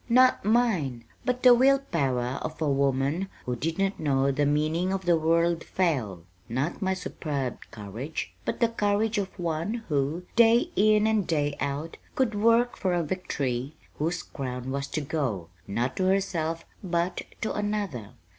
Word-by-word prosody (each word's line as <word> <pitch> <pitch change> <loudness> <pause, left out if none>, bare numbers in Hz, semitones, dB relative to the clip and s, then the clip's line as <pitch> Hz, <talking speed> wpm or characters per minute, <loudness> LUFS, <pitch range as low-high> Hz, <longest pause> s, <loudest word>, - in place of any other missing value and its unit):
"Not 255 +2 +5
mine, 190 - +1 0.2
but 250 -1 -1
the 250 -1 +9
will 265 +3 +5
power 135 - -1
of - - -5
a 155 - 0
woman 140 +5 +1 0.2
who 125 - -1
did 160 +7 -2
not 195 0 0
know 140 -2 +2
the 145 +1 +1
meaning 155 +5 +1
of 190 -1 -2
the 175 -1 +5
word 165 +1 +2
'fail.' 125 - -1 0.3
Not 130 +8 -2
my 190 -1 +1
superb 145 -7 -3
courage, 115 +9 -6
but - - -3
the 235 - +4
courage 210 0 +1
of 195 -1 -4
one 175 +7 -2
who, 145 +4 0
day 235 +8 +5
in 215 +1 +4
and 220 -4 +2
day 145 -3 0
out, 145 +4 -3 0.2
could 255 -4 +1
work 230 +3 +3
for 185 -2 0
a 175 - +1
victory 145 -6 -2 0.2
whose 170 +3 -1
crown 130 -2 -5
was 140 0 -2
to 155 - -2
go, 130 - -2 0.2
not 120 +6 -1
to 185 - +1
herself, 170 -4 0 0.2
but 175 0 -1 0.2
to 215 - -1
another. 205 - -3
165 Hz, 165 wpm, -27 LUFS, 140-205 Hz, 0.3 s, the